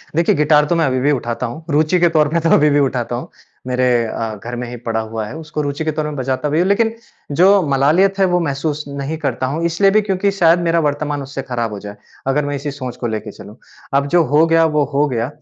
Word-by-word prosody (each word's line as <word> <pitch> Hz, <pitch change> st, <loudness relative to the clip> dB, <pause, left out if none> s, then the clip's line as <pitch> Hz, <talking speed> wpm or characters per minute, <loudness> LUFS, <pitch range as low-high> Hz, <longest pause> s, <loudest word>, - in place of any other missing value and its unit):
देखिए, 170 Hz, +1 st, +3 dB
गिटार 150 Hz, 0 st, +4 dB
तो 175 Hz, -, +2 dB
मैं 165 Hz, -1 st, +2 dB
अभी 130 Hz, -1 st, 0 dB
भी 145 Hz, +3 st, +2 dB
उठाता 120 Hz, -2 st, -2 dB
हूँ। 140 Hz, +7 st, -7 dB
रुचि 155 Hz, +4 st, +2 dB
के 175 Hz, -, +4 dB
तौर 150 Hz, -1 st, +4 dB
पे 170 Hz, +3 st, +1 dB
तो 165 Hz, 0 st, 0 dB
अभी 150 Hz, +1 st, +4 dB
भी 145 Hz, 0 st, +3 dB
उठाता 125 Hz, -3 st, -1 dB
हूँ। 120 Hz, -, -6 dB, 0.4 s
मेरे 125 Hz, 0 st, 0 dB, 0.2 s
अ, 110 Hz, 0 st, -4 dB
घर 120 Hz, +1 st, -5 dB
में 125 Hz, 0 st, -5 dB
ही 120 Hz, -, -7 dB
पड़ा 115 Hz, -1 st, -3 dB
हुआ 110 Hz, 0 st, -4 dB
है। 125 Hz, -, -8 dB
उसको 155 Hz, -1 st, -5 dB
रुचि 145 Hz, +2 st, -3 dB
के 155 Hz, -, +1 dB
तौर 155 Hz, 0 st, -3 dB
में 150 Hz, -1 st, -4 dB
बजाता 130 Hz, +2 st, -2 dB
भी 155 Hz, -, +1 dB
हूँ 180 Hz, -, +2 dB
लेकिन 225 Hz, +3 st, +1 dB, 0.4 s
जो 195 Hz, +2 st, +6 dB
मलालियत 160 Hz, +9 st, +2 dB
है, 195 Hz, -, +5 dB
वो 180 Hz, -1 st, +1 dB
महसूस 150 Hz, -1 st, -2 dB
नहीं 140 Hz, +2 st, -4 dB
करता 135 Hz, -5 st, -2 dB
हूँ। 165 Hz, +2 st, -3 dB
इसलिए 170 Hz, +4 st, +3 dB
भी 215 Hz, +2 st, +4 dB
क्योंकि 200 Hz, -1 st, 0 dB
शायद 175 Hz, -3 st, +3 dB
मेरा 165 Hz, 0 st, +2 dB
वर्तमान 145 Hz, 0 st, -2 dB
उससे 135 Hz, 0 st, -6 dB
खराब 120 Hz, -2 st, -2 dB
हो 105 Hz, -, -6 dB
जाए, 100 Hz, +1 st, -9 dB, 0.3 s
अगर 140 Hz, +2 st, +1 dB
मैं 145 Hz, 0 st, -2 dB
इसी 140 Hz, +1 st, -4 dB
सोच 130 Hz, -3 st, -6 dB
को -, -, +1 dB
लेके 110 Hz, -1 st, -4 dB
चलूँ, 105 Hz, +2 st, -13 dB, 0.4 s
अब 140 Hz, 0 st, 0 dB
जो 175 Hz, -1 st, +5 dB
हो 155 Hz, +2 st, +6 dB
गया 165 Hz, 0 st, +4 dB
वो 150 Hz, -, +3 dB
हो 145 Hz, +2 st, +2 dB
गया। 115 Hz, +1 st, -1 dB
145 Hz, 255 wpm, -18 LUFS, 130-165 Hz, 0.4 s, जो